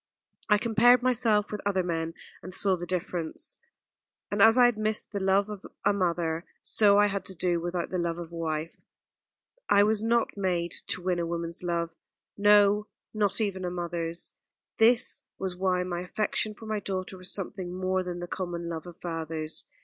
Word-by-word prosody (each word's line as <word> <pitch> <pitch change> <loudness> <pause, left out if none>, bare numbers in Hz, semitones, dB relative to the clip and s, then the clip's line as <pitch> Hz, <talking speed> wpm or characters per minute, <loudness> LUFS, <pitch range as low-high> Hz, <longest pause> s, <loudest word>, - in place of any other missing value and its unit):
I 210 - +6
compared 235 +3 +4
myself 220 -4 +2
with 210 - -4
other 195 -2 +1
men, 165 -1 -2 0.3
and 185 - -8
saw 190 +1 +4
the 175 0 -6
difference; 180 - -2 0.7
and 205 0 0
as 225 +3 +7
I 250 - +7
had 245 -2 +3
missed 215 0 -1
the 205 - -2
love 195 +1 +2
of 210 -2 -8 0.2
a 205 - +4
mother, 170 -3 0 0.2
so 205 -2 +5
I 205 - +6
had 200 -2 -1
to 190 - -5
do 175 -1 0
without 175 0 -3
the 185 - -1
love 170 -1 -1
of 170 -1 -7
a - - -9
wife. 160 -1 -3 0.9
I 200 0 +6
was 215 0 +2
not 230 +1 +1
made 180 -4 -1 0.2
to 180 - -2
win 180 -1 0
a 170 - -1
woman's 170 0 -3
love 170 -1 -1 0.4
no, 205 0 +5 0.3
not 210 -1 +1
even 195 -4 -1
a 180 - -1
mother's. 170 -1 -4 0.5
This 235 +2 +4 0.2
was 190 -2 -3
why 180 -1 +1
my 175 -1 -3
affection 215 +3 -2
for 220 - -11
my 215 -1 -2
daughter 190 -1 -4
was 185 0 -5
something 190 -2 -4
more 185 +1 -1
than 175 -1 -5
the 175 - -5
common 175 -2 -4
love 165 0 -5
of 175 -1 -11
fathers. 160 -2 -4
185 Hz, 190 wpm, -28 LUFS, 170-205 Hz, 0.9 s, as